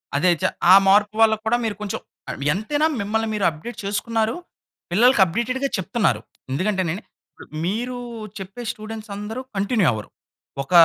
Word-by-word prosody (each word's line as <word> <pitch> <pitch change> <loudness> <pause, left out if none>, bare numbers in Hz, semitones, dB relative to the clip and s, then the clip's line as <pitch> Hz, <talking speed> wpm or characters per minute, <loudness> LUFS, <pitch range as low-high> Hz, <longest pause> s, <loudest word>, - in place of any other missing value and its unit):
అదే 155 +6 +3
చ - - -5 0.3
ఆ - - +11
మార్పు 210 +2 +4
వల్ల 220 -1 +6
కూడా 235 +2 +3
మీరు 220 -2 -1
కొంచెం 210 -2 -3 0.3
ఆహ్ 140 - -5
ఎంతైనా 290 - +1
మిమ్మల్ని 220 +2 0
మీరు 205 -3 0
అప్డేట్ 165 +10 -8
చేసుకున్నారు. 220 +2 0 0.6
పిల్లలకి 235 +4 +5
అప్డేటెడ్‌గా 245 +9 -1
చెప్తున్నారు. 210 +4 0 0.3
ఎందుకంటేనండి 185 +4 -1 0.6
మీరు 240 +7 -2 0.4
చెప్పే 195 +4 -8
స్టూడెంట్స్ 220 -1 -8
అందరూ 210 +5 -5
కంటిన్యూ 200 -1 +2
అవ్వరు. 110 -2 -5 0.5
ఒక 135 - -19
215 Hz, 140 wpm, -22 LUFS, 190-230 Hz, 0.6 s, ఆ